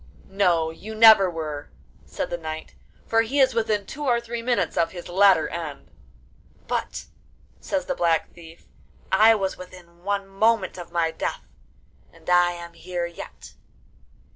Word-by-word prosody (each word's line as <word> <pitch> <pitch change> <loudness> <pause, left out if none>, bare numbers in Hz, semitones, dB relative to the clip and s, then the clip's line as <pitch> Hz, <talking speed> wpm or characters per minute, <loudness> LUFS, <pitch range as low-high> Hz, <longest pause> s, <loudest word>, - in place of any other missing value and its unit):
'No, 175 -5 +1
you 215 +7 -9
never 215 -4 +8
were,' 155 -3 -6 0.4
said - - -4
the 175 - -2
knight; 160 -1 -7 0.3
'for 225 0 +3
he 250 +6 -1
is 260 -1 +5
within 220 -3 0
two 295 +8 -7
or 240 -3 +3
three 235 0 -6
minutes 230 -7 0
of 165 +1 0
his 175 -2 -8
latter 190 -2 +4
end.' 155 -5 -7 0.8
'But,' - - -3 0.5
says 290 -1 -2
the 275 - -1
Black 170 - 0
Thief, 165 -1 -15 0.4
'I 220 +4 +6
was 195 -3 -2
within 180 -2 -13
one 200 0 -2
moment 195 -1 +1
of 175 - -9
my 170 -1 +1
death, - - -4 0.7
and - - -21
I 175 0 +4
am 170 0 -9
here 175 +1 -4
yet. 170 -1 -10
185 Hz, 155 wpm, -24 LUFS, 170-220 Hz, 0.8 s, never